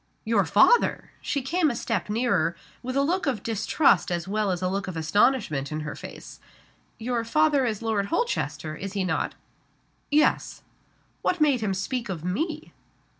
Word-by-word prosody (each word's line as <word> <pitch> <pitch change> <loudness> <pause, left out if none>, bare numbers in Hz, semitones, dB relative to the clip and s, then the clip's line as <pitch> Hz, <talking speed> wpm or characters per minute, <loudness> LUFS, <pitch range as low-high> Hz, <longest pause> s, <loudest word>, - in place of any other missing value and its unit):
"Your 220 -4 +2
father!" 215 - +4
She 280 - -2
came 320 +4 +2
a 240 - -2
step 225 -3 -2
nearer, 215 -7 +1 0.3
with 255 +1 -4
a 275 - +3
look 350 +3 0
of 250 -8 -1
distrust 225 +2 +2
as 175 0 -2
well 210 +1 0
as 180 -1 -2
a - - +2
look 195 +2 -2
of 185 -3 -5
astonishment 160 - +1
in 155 0 -3
her 150 0 -5
face. - - -10 0.6
"Your 235 0 -2
father 285 +2 +2
is 220 -1 -3
Lord 215 -3 0
Holchester 330 - -2
is 195 +3 -6
he 200 -2 -1
not?" 165 -4 -1 0.7
"Yes." 300 +1 +1 0.6
"What 360 - 0
made 285 -6 +3
him 200 -3 0
speak 230 +4 -3
of 170 -4 -4
_me? 310 - -3
220 Hz, 170 wpm, -26 LUFS, 185-275 Hz, 0.7 s, father